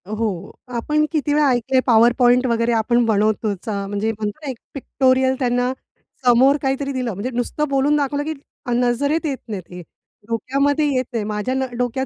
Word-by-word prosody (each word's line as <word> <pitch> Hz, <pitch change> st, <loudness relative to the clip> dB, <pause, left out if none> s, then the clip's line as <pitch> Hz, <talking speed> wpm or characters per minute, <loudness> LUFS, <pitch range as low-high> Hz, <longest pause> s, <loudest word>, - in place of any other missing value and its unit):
हो, 215 Hz, -4 st, -3 dB, 0.2 s
आपण 300 Hz, +6 st, +1 dB
किती 295 Hz, -2 st, 0 dB
वेळा 300 Hz, 0 st, +3 dB
ऐकले 255 Hz, +1 st, +1 dB
पॉवर 235 Hz, 0 st, +6 dB
पॉइंट 250 Hz, +1 st, +4 dB
वगैरे 230 Hz, 0 st, +1 dB
आपण 235 Hz, +2 st, +2 dB
बनवतोचा 210 Hz, -1 st, 0 dB
म्हणजे 205 Hz, +2 st, -1 dB
म्हणतो 210 Hz, +1 st, -5 dB
ना, -, -, -3 dB
एक 255 Hz, -, -5 dB, 0.2 s
पिक्टोरियल 260 Hz, -1 st, +1 dB
त्यांना 245 Hz, -1 st, +1 dB, 0.5 s
समोर 255 Hz, +4 st, +5 dB
काहीतरी 275 Hz, 0 st, -1 dB
दिलं. 255 Hz, -3 st, -2 dB
म्हणजे 200 Hz, +7 st, -4 dB
नुसतं 245 Hz, +5 st, -1 dB
बोलून 275 Hz, +2 st, +2 dB
दाखवलं 285 Hz, 0 st, -1 dB
की 315 Hz, +1 st, -3 dB, 0.3 s
अ, 245 Hz, -, -3 dB
नजरेत 250 Hz, +7 st, +1 dB
येत 280 Hz, -3 st, -1 dB
नाहीत 200 Hz, -4 st, -4 dB
ते, 180 Hz, 0 st, -9 dB, 0.5 s
डोक्यामध्ये 275 Hz, +6 st, 0 dB
येत 255 Hz, -, +1 dB
नाही. 230 Hz, -3 st, -1 dB
माझ्या 210 Hz, +4 st, -2 dB
न 265 Hz, 0 st, 0 dB
डोक्यात 250 Hz, +2 st, -1 dB
245 Hz, 175 wpm, -20 LUFS, 225-275 Hz, 0.5 s, पॉवर